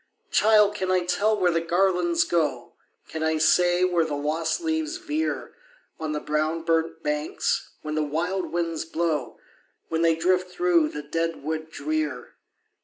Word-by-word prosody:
"Child! 210 Hz, -1 st, +5 dB
can 190 Hz, -3 st, -3 dB
I 185 Hz, -1 st, +2 dB
tell 210 Hz, +4 st, +1 dB
where 180 Hz, -2 st, +3 dB
the 165 Hz, 0 st, +1 dB
garlands 175 Hz, -1 st, +2 dB
go? 170 Hz, -3 st, -1 dB, 0.3 s
Can 160 Hz, -, -6 dB
I 160 Hz, 0 st, +1 dB
say 175 Hz, +3 st, +3 dB
where 175 Hz, -2 st, +3 dB
the 155 Hz, -2 st, -3 dB
lost 155 Hz, +3 st, -1 dB
leaves 320 Hz, 0 st, -2 dB
veer 320 Hz, -3 st, -3 dB, 0.5 s
On 155 Hz, -1 st, -3 dB
the 150 Hz, -, -2 dB
brown 155 Hz, +2 st, -1 dB
burnt 165 Hz, 0 st, 0 dB
banks, 150 Hz, +1 st, -1 dB
when 155 Hz, 0 st, -4 dB
the 155 Hz, -, 0 dB
wild 175 Hz, +6 st, -2 dB
winds 165 Hz, -2 st, -1 dB
blow, 160 Hz, -5 st, -2 dB, 0.5 s
When 165 Hz, 0 st, 0 dB
they 165 Hz, -1 st, +4 dB
drift 180 Hz, +2 st, +1 dB
through 175 Hz, -3 st, +2 dB
the 150 Hz, 0 st, -6 dB
dead 165 Hz, +1 st, -2 dB
wood 160 Hz, +1 st, -3 dB
drear? 315 Hz, -, -3 dB
165 Hz, 160 wpm, -25 LUFS, 160-185 Hz, 0.5 s, Child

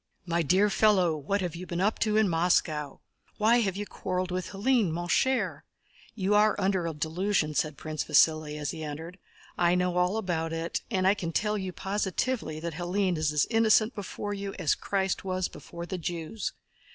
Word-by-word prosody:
"My 170 Hz, -1 st, 0 dB
dear 185 Hz, +6 st, +3 dB
fellow, 190 Hz, -6 st, +3 dB
what 175 Hz, +7 st, -1 dB
have 175 Hz, -3 st, -3 dB
you 180 Hz, +2 st, -7 dB
been 170 Hz, 0 st, -3 dB
up 205 Hz, +4 st, +1 dB
to 215 Hz, -1 st, +2 dB
in 220 Hz, -1 st, +4 dB
Moscow? 165 Hz, -4 st, +1 dB, 0.4 s
Why 230 Hz, +3 st, +4 dB
have 195 Hz, -4 st, 0 dB
you 205 Hz, -, -3 dB
quarreled 185 Hz, -2 st, -3 dB
with 180 Hz, -1 st, -2 dB
Hélène, 215 Hz, 0 st, +1 dB
mon 175 Hz, +2 st, -3 dB
cher? 260 Hz, +8 st, +1 dB, 0.5 s
You 200 Hz, -1 st, 0 dB
are 210 Hz, +1 st, +4 dB
under 190 Hz, -3 st, +1 dB
a 165 Hz, -, -3 dB
delusion," 160 Hz, +1 st, 0 dB
said 150 Hz, -1 st, -1 dB
Prince 155 Hz, -1 st, -4 dB
Vasíli, 155 Hz, -2 st, +3 dB
as 145 Hz, -1 st, -2 dB
he 160 Hz, -, -6 dB
entered. 160 Hz, +5 st, -7 dB, 0.4 s
"I 175 Hz, 0 st, +4 dB
know 180 Hz, 0 st, 0 dB
all 180 Hz, +4 st, +2 dB
about 165 Hz, -6 st, -2 dB
it, 165 Hz, +1 st, -2 dB
and 190 Hz, -5 st, 0 dB
I 195 Hz, -, +6 dB
can 175 Hz, -5 st, -4 dB
tell 210 Hz, +5 st, 0 dB
you 190 Hz, -3 st, -3 dB
positively 195 Hz, -1 st, -2 dB
that 170 Hz, 0 st, -4 dB
Hélène 180 Hz, +2 st, 0 dB
is 155 Hz, -1 st, 0 dB
as 150 Hz, -2 st, +2 dB
innocent 225 Hz, +1 st, +4 dB
before 205 Hz, 0 st, -5 dB
you 200 Hz, -1 st, -5 dB
as 150 Hz, -, +2 dB
Christ 195 Hz, -2 st, -1 dB
was 185 Hz, -1 st, -1 dB
before 170 Hz, 0 st, -9 dB
the 185 Hz, +1 st, -4 dB
Jews." 170 Hz, +5 st, -4 dB
180 Hz, 190 wpm, -28 LUFS, 165-205 Hz, 0.5 s, I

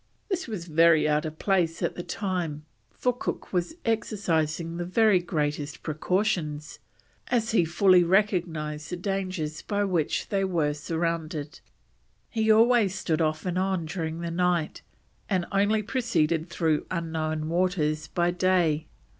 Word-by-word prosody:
This 370 Hz, -6 st, -2 dB
was 205 Hz, -7 st, -5 dB
very 165 Hz, -1 st, +4 dB
out 150 Hz, +1 st, +1 dB
of 155 Hz, 0 st, -8 dB
place 175 Hz, -4 st, +1 dB
at -, -, 0 dB
the -, -, -5 dB
time, 175 Hz, -6 st, -3 dB, 0.2 s
for 250 Hz, -, -1 dB
Cook 245 Hz, -, -5 dB
was 180 Hz, -, -1 dB
exercising 170 Hz, -7 st, -1 dB
the 175 Hz, -, -2 dB
very 200 Hz, +2 st, +4 dB
greatest 150 Hz, -4 st, -3 dB
precautions, 155 Hz, -2 st, -1 dB, 0.5 s
as 235 Hz, -3 st, +1 dB
he 220 Hz, -6 st, +4 dB
fully 180 Hz, +2 st, +5 dB
recognised 170 Hz, -6 st, 0 dB
the 180 Hz, -, -4 dB
dangers 185 Hz, -5 st, -3 dB
by 205 Hz, -1 st, -1 dB
which 175 Hz, -6 st, -1 dB
they 195 Hz, -1 st, +1 dB
were 165 Hz, -6 st, +1 dB
surrounded. 160 Hz, -1 st, -3 dB, 0.7 s
He 220 Hz, -1 st, 0 dB
always 225 Hz, -3 st, +4 dB
stood 165 Hz, -4 st, -1 dB
off 155 Hz, +1 st, 0 dB
and 180 Hz, 0 st, -1 dB
on 190 Hz, -3 st, 0 dB
during 160 Hz, 0 st, -4 dB
the 170 Hz, 0 st, -3 dB
night, 175 Hz, -2 st, 0 dB, 0.5 s
and 185 Hz, -4 st, +1 dB
only 205 Hz, +2 st, +2 dB
proceeded 170 Hz, -8 st, 0 dB
through 160 Hz, -3 st, 0 dB
unknown 160 Hz, -2 st, -2 dB
waters 160 Hz, -3 st, 0 dB
by 175 Hz, +1 st, +1 dB
day. 175 Hz, -4 st, +1 dB
175 Hz, 140 wpm, -27 LUFS, 155-195 Hz, 0.7 s, fully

